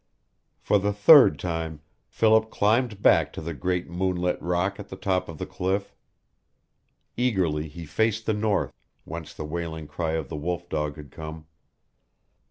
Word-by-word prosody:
For 105 - +2
the 105 +1 0
third 105 - +7
time 80 -2 -4 0.3
Philip 110 0 +3
climbed 110 0 +1
back - - +5
to - - -6
the 85 +1 -4
great 90 +5 -2
moonlit 90 0 -1
rock 90 +4 -1
at 100 - -9
the - - -7
top 95 -2 -1
of 80 - -7
the - - -4
cliff. 95 +2 -2 1.2
Eagerly 90 -11 0
he 80 +2 -9
faced 110 +8 0
the 110 - +1
north, 105 -1 0 0.3
whence 80 -3 -7
the 75 - -7
wailing 80 0 -4
cry 80 +2 -3
of 80 -4 -2
the - - -6
wolf 85 +3 -3
dog 75 -3 -2
had 75 -3 -11
come. 80 0 -8
90 Hz, 160 wpm, -26 LUFS, 80-100 Hz, 1.2 s, third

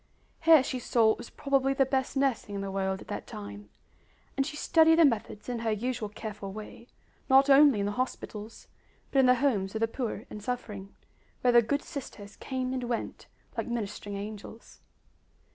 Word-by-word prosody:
Here 320 -4 +7
she 255 -1 -3
saw 230 -2 +3
what 220 - +1
was - - -9
probably 275 -1 0
the 270 - +4
best 265 +1 -1
nursing 260 -7 0
in 200 - -3
the 195 0 -4
world 190 0 -2
at - - -12
that - - -5
time; 100 0 -9 0.7
and 275 0 0
she 300 - -6
studied 320 +1 +5
the 335 - +7
methods 225 -5 -1
in 245 -2 -3
her 225 0 -1
usual 225 0 -2
careful 210 -2 -7
way, 215 +3 -10 0.4
not 270 +1 +6
only 275 -6 +6
in - - 0
the 205 - -1
hospitals, 220 -2 -5 0.4
but 275 - +3
in 260 - +5
the 250 - +6
homes 225 -7 0
of - - -1
the 225 - +2
poor 235 0 -4
and 210 - -9
suffering, 210 -4 -5 0.5
where 250 - +4
the 240 - +8
good 280 +6 -1
sisters 210 -7 -8
came 260 -1 -3
and 255 -1 -2
went 235 -1 -4 0.3
like - - -3
ministering 205 -3 -4
angels. 210 +2 -9
235 Hz, 190 wpm, -29 LUFS, 205-265 Hz, 0.7 s, the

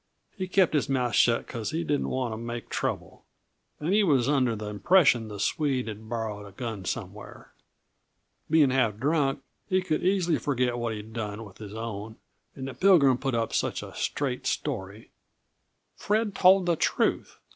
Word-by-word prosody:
He 185 -2 -4
kept 185 -2 +3
his 150 -1 +1
mouth 125 -4 0
shut 115 +2 +3
because 115 -2 -5
he 165 +2 -2
didn't 145 -3 -1
want 125 -3 -2
to - - -5
make 120 +1 -6
trouble, - - -3 0.6
and 160 +5 -1
he 210 +1 +4
was 135 -9 +3
under 130 -5 +2
the 105 0 -6
impression 115 - +3
the 105 -2 -8
Swede 135 +1 0
had 110 0 -8
borrowed 110 -3 -4
a - - -12
gun 110 -2 -6
somewhere. - - -7 1.0
Being 150 -4 +5
half 115 -6 +1
drunk, 140 +2 0 0.3
he 185 -1 +2
could 155 -4 -1
easy 180 -3 +2
forget 125 -3 0
what 115 -2 -2
he'd 105 +1 -9
done 110 -1 -5
with 100 - -15
his 105 -1 -8
own, 110 -1 -6 0.4
and 130 -1 -6
the 135 - -6
Pilgrim 150 -10 +5
put 135 -3 -1
up 115 -1 -1
such - - -1
a - - -10
straight 130 -3 -2
story 105 -6 -4 0.4
" - - -49
"Fred 215 0 0
told 190 0 +5
the 170 -1 +2
truth. - - 0
125 Hz, 180 wpm, -27 LUFS, 110-155 Hz, 1.0 s, Being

